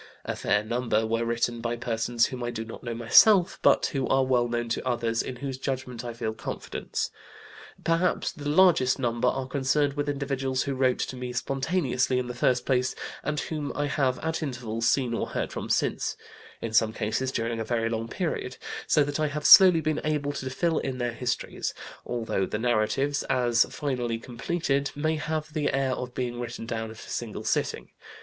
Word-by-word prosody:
A - - -2
fair 105 - +1
number 115 -1 0
were 115 +1 0
written 120 0 -1
by 120 0 -1
persons 115 0 +1
whom 130 -2 -5
I 120 - -1
do 115 -1 -4
not 115 - -9
myself 120 - +5
know, - - +8
but - - +1
who 135 -2 0
are 135 0 +3
well 125 -2 +2
known 120 0 -2
to 115 - -1
others 115 -2 0
in 130 - -5
whose 130 +1 -5
judgment 130 -3 -4
I 120 - -4
feel 115 -1 -3
confidence. - - -4 0.7
Perhaps 170 +2 +1
the 145 -3 -5
largest 155 -6 +5
number 120 0 0
are 130 +1 0
concerned 140 +1 +1
with 145 0 -2
individuals 135 -2 -1
who 140 - -2
wrote 130 -1 +2
to - - -3
me 125 -1 -5
spontaneously 135 -1 0
in 125 - 0
the 125 - -5
first 125 +1 +1
place, 130 -1 +1 0.3
and 150 0 -1
whom 150 -3 -4
I 145 - 0
have 140 -3 +1
at 160 +1 -1
intervals 120 -5 -2
seen 125 -4 +1
or - - -1
heard - - -3
from - - -5
since, - - 0 0.5
in 115 -1 -3
some 110 -1 +4
cases 115 +6 -1
during 115 -1 -2
a - - -1
very 115 0 0
long 115 0 -2
period, 150 -4 -3 0.3
so 150 - +4
that 145 +1 -3
I 155 - +2
have 150 0 -4
slowly 185 -4 +9
been 155 -1 -1
able 150 -2 0
to 130 -2 -4
fill 165 +4 0
in 130 -1 -3
their 120 -1 -1
histories, 125 +1 -3 0.3
although 115 -6 -1
the - - -2
narratives, 120 +5 +1
as 120 -2 +3
finally 125 -5 -2
completed, 140 +4 -1
may 155 +2 0
have 155 0 -3
the 150 -3 0
air 135 -1 +1
of 125 -1 -5
being 120 -1 -3
written 120 -1 -5
down 115 -1 -3
at 110 - -10
a - - -11
single 115 -3 -4
sitting. - - -1
125 Hz, 195 wpm, -27 LUFS, 115-145 Hz, 0.7 s, slowly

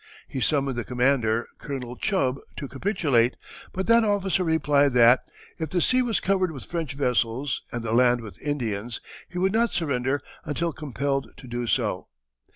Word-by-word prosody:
He 130 - -4
summoned 135 -4 +1
the 120 - -1
commander, 125 -2 +1
Colonel 125 -4 -5
Chubb, 140 -7 0 0.2
to 140 - -4
capitulate, 135 - +1 0.3
but 190 +1 -3
that 230 0 +5
officer 195 -3 +1
replied 145 -4 +3
that, 120 +1 +7 0.4
"if 160 -2 -2
the 180 - +1
sea 255 +8 +3
was 240 -3 +1
covered 185 -2 +1
with 135 -5 -8
French 165 -5 -3
vessels 125 -1 0
and 120 -1 -4
the 115 -1 -2
land 120 0 +4
with 110 -3 -11
Indians, 120 -6 -2 0.3
he 180 - -7
would 190 +2 +2
not 230 +1 +2
surrender 140 -4 0 0.2
until 165 +2 -2
compelled 140 -3 -2
to - - -12
do 120 0 -3
so." - - 0
140 Hz, 165 wpm, -25 LUFS, 125-170 Hz, 0.4 s, that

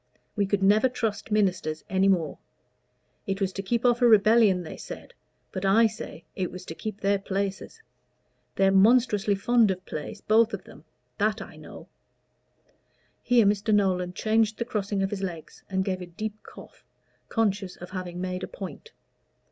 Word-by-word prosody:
We 200 -3 +1
could 195 0 0
never 215 +6 +5
trust 225 -5 -3
ministers 185 -7 0
any 190 +1 +2
more. 170 -6 +1 0.9
It 195 0 -2
was 195 -2 -1
to 195 - -4
keep 235 +5 -1
off 240 0 +3
a 245 - +6
rebellion, 215 -3 +5
they 160 - -8
said; - - -9 0.4
but 185 - -5
I 205 +4 +5
say 215 -6 -5
it 185 -2 -2
was 185 0 -9
to - - -6
keep 215 +4 -6
their 200 0 +2
places. 195 - -4 0.7
They're 195 0 +3
monstrously 210 0 +4
fond 225 +2 +3
of 185 -1 -3
place, 150 -2 -6
both 220 0 +3
of 190 - -11
them 150 - -15 0.3
that 215 +1 +1
I - - -9
know." - - -12 1.3
Here 245 -3 +4
Mr. 205 +2 +1
Nolan 185 -3 +2
changed 220 +1 +1
the 235 - -2
crossing 200 -3 -2
of 195 - -1
his 200 -2 -4
legs, 170 -5 -6
and 190 -1 0
gave 185 -2 -2
a 180 - -7
deep 210 +5 -5
cough, - - -14 0.5
conscious 200 -4 0
of 180 - -11
having 180 -2 -5
made 185 0 -3
a - - -4
point. - - -9
200 Hz, 170 wpm, -26 LUFS, 185-220 Hz, 1.3 s, a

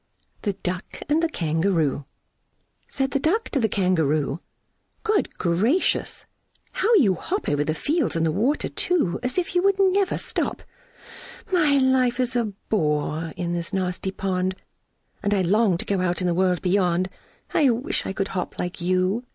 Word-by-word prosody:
The 205 - -1
Duck 180 +1 -4
and 305 +2 +3
The 330 - +1
Kangaroo. 160 - 0 0.8
Said 270 -1 -1
the 275 - +1
Duck 375 +11 +1
to 280 - 0
the 220 -3 +1
Kangaroo, 160 -6 +1 0.6
"Good 430 -2 0
gracious! 210 - +1 0.5
how 440 - +1
you 235 - +5
hop 390 - -3
Over 145 0 +1
the 155 +1 -1
fields 295 - 0
and 165 0 +1
the 160 - +2
water 245 - +1
too, 320 - 0
As 250 +4 -2
if 355 -2 -1
you 355 - +3 0.3
never 395 0 +1
would - - -3
stop! - - -3 0.9
My 305 -6 +4
life 260 -2 +2
is 250 -1 0
a 240 -1 +2
bore 160 -6 -1
in 175 -1 -2
this 170 +3 -3
nasty 185 0 -1
pond, 185 -1 -1 0.7
And 205 0 +1
I 190 - +2
long 200 0 +3
to - - -5
go 195 -2 0
out 180 -1 0
in 185 - -1
the 175 - +2
world 180 0 +1
beyond! 180 -1 +2 0.5
I 285 -4 +4
wish 250 +10 -1
I - - -2
could 195 0 -2
hop 180 -2 -4
like 180 0 -4
you!" 185 +6 +1
195 Hz, 170 wpm, -24 LUFS, 175-260 Hz, 0.9 s, you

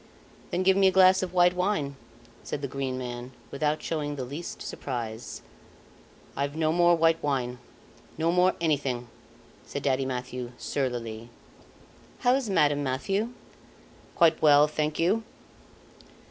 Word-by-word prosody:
"Then 180 +2 -1
give 190 0 +5
me 195 0 +5
a - - +4
glass 185 0 +6
of 185 -2 -3
white 180 0 +4
wine," 180 -7 -1 0.5
said 145 - -5
the - - -1
Green 135 -1 -3
Man, 125 0 -6 0.2
without 150 +2 -1
showing 150 -3 -2
the 135 - -4
least 145 +7 -7
surprise. 120 -3 -6 0.9
"I've 140 +1 -2
no 155 -1 +1
more 175 +1 +4
white 165 0 +3
wine 125 -4 -1 0.6
no 165 +1 +1
more 180 +1 +3
anything," 135 -7 -1 0.5
said - - -6
Daddy 135 -1 +1
Mathieu, 125 -1 -5
surlily. 120 -4 -3 0.9
"How 245 0 +4
is 260 -4 0
Madame 145 -6 +3
Mathieu?" 195 - -1 0.9
"Quite 165 -2 +4
well, 150 -1 +6
thank 150 0 -2
you." 185 +7 +2
150 Hz, 135 wpm, -27 LUFS, 130-175 Hz, 0.9 s, glass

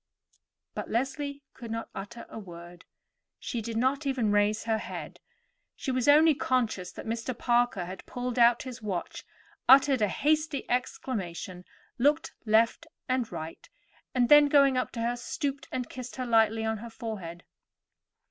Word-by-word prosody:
But - - -5
Leslie 280 +3 -2
could 235 -2 -9
not 225 0 -4
utter 220 +5 -7
a - - -8
word, 175 -3 -11 0.5
she 235 - -4
did 225 +1 -4
not 270 +4 +1
even 250 -6 +1
raise 205 +1 +2
her 225 -1 0
head; - - -7 0.6
she 265 - -3
was 255 0 0
only 310 +2 +7
conscious 255 - -1
that - - -9
Mr. 230 +2 -3
Parker 240 -7 +1
had 185 +2 -9
pulled 245 0 -3
out 235 0 +5
his 255 -2 -8
watch, 195 -5 -4 0.5
uttered 270 -1 +7
a 210 - +4
hasty 305 - 0
exclamation, 190 -8 -3 0.3
looked 295 +5 +2
to - - -8
right 230 +8 +3 0.2
and 255 -3 0
left, 160 +1 -7 0.6
then, 295 0 +8
going 275 -2 +5
up 255 - 0
to 230 - -4
her, 235 +1 0
stooped 280 +2 -4
and 250 -2 -3
kissed 255 -1 -8
her 255 - -3
lightly 225 -1 +3
on 220 0 -1
her 235 +2 -8
forehead. 205 -8 -7
240 Hz, 155 wpm, -28 LUFS, 215-265 Hz, 0.6 s, then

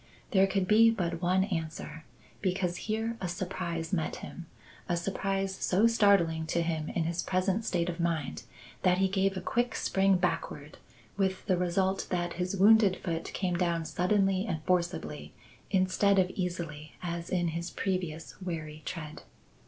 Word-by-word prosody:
There 195 -3 +5
could 195 -1 0
be 225 +2 +7
but 180 -6 -1
one 185 +1 +3
answer: 160 -4 -4 0.4
because 180 -2 0
here 225 +2 -1
a 185 - -1
surprise 175 -1 -3
met 160 -4 0
him 175 -2 -9 0.4
a 175 - +1
surprise 195 +1 -1
so 190 +2 +2
startling 195 -8 +3
to 170 +1 +1
him 160 -2 -2
in 170 - -1
his 170 +2 -1
present 190 +4 0
state 170 -2 0
of 175 -1 -4
mind, 165 -4 -1 0.4
that 180 -1 +3
he 190 0 +3
gave 195 0 +1
a - - -3
quick 240 +1 0
spring 195 0 +3
backward, 155 -4 -3 0.4
with 190 -1 0
the 185 - +2
result 185 +2 0
that 175 -1 -1
his 180 +3 -2
wounded 205 -1 +6
foot 165 -3 -3
came 180 -2 -1
down 170 -2 0
suddenly 195 +3 +1
and 160 -4 -3
forcibly 180 0 -1 0.4
instead 195 +1 +3
of 185 -1 +3
easily 170 -5 -4
as 170 -1 -4
in 175 -2 +1
his 170 +2 -3
previous 175 -4 -3
wary 155 -4 -5
tread. 155 -4 -6
180 Hz, 160 wpm, -30 LUFS, 170-195 Hz, 0.4 s, be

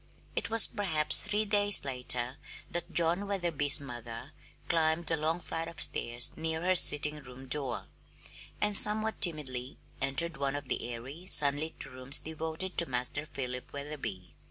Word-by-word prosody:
It - - -3
was 225 0 +7
perhaps 160 -9 +3
three 210 +1 -2
days 205 -4 +4
later 125 -1 -5 0.3
that 175 0 -6
John 170 +4 +3
Wetherby's 170 -7 +2
mother 120 -1 -10 0.4
climbed 165 0 -1
the 160 - -2
long 160 +2 -3
flight 165 -1 -6
of 170 - -10
stairs 120 +1 +1
near 160 +1 -4
her 185 +1 +1
sitting 150 -3 +5
room 130 0 -14
door, 130 -3 -3 0.7
and 210 -1 -1
somewhat 215 +2 +4
timidly 135 -7 0 0.2
entered 140 +4 -1
one 140 0 -3
of 145 -2 -8
the 120 - -4
airy, 135 +10 -10
sunlit 150 +2 +2
rooms 130 +1 +1
devoted 160 +3 -3
to 170 -4 +2
Master 125 +4 -4
Philip 125 -3 -7
Wetherby. 140 -10 -8
150 Hz, 150 wpm, -29 LUFS, 130-170 Hz, 0.7 s, was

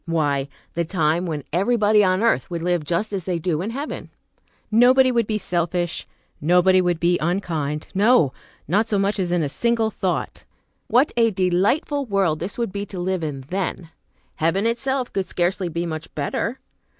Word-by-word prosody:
Why, 145 -4 0 0.2
the 170 - 0
time 165 0 0
when 150 -4 -3
everybody 210 +2 +3
on 185 +2 +2
earth 225 -4 +2
would 170 -2 -4
live 175 -2 0
just 175 +8 -2
as 190 -4 -3
they 180 -2 -1
do 165 -1 -1
in 200 - -3
heaven. 275 +6 -5 0.6
Nobody 255 +3 +5
would 235 -3 +1
be 215 - 0
selfish, 175 -2 -2 0.3
nobody 180 +4 +4
would 175 -2 0
be 175 +1 +2
unkind; 160 -4 -2
no! 200 - +4 0.3
not 205 +8 +2
so 210 - +1
much 195 +1 0
as 180 -2 -1
in 175 -2 +1
a - - 0
single 225 +7 0
thought. - - -3 0.4
What 255 +3 +3
a 230 -1 +4
delightful 205 - +1
world 195 -7 +1
this 180 +4 -5
would 235 -4 -2
be 200 +1 -3
to 190 -2 -7
live 185 -1 -1
in 145 -3 -4
then! 180 -3 -3 0.5
Heaven 165 +6 +1
itself 255 +2 -1
could 195 -1 -1
scarcely 180 +1 -1
be 170 +1 -3
much 160 -1 -6
better! 155 - -2
185 Hz, 175 wpm, -22 LUFS, 170-215 Hz, 0.6 s, Nobody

